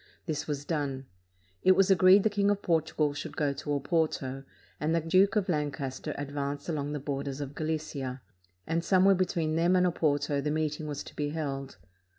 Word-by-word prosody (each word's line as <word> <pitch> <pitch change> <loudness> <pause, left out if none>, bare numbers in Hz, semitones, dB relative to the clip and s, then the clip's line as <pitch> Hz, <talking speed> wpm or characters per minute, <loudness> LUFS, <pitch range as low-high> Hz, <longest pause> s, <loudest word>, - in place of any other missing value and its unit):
This 155 -2 -3
was 145 -1 -3
done. 140 -4 -2 0.6
It 185 - +6
was 195 0 +4
agreed 190 +1 +7
the 220 - +3
King 200 0 +2
of 205 0 0
Portugal 160 -3 +1
should 145 - -7
go 145 -2 +1
to 145 +2 -8
Oporto, 140 -2 -1 0.4
and 155 +3 +1
the - - +3
Duke 185 +6 +3
of 205 -3 +1
Lancas 145 -5 -2
ter - - -5
advance 145 0 -4
along 150 -3 -2
the 150 - -2
borders 140 0 -4
of 140 -1 -5
Galicia; 145 -5 -4 0.4
and 165 +1 -1
some 185 +1 +4
where 195 - +7
between 170 -4 0
them 170 +2 +3
and 180 0 +4
Oporto 145 -4 +1
the 150 - 0
meeting 155 0 -1
was 145 -1 -4
to - - -13
be 145 -1 -1
held. 140 -3 -4
150 Hz, 190 wpm, -29 LUFS, 140-170 Hz, 0.6 s, agreed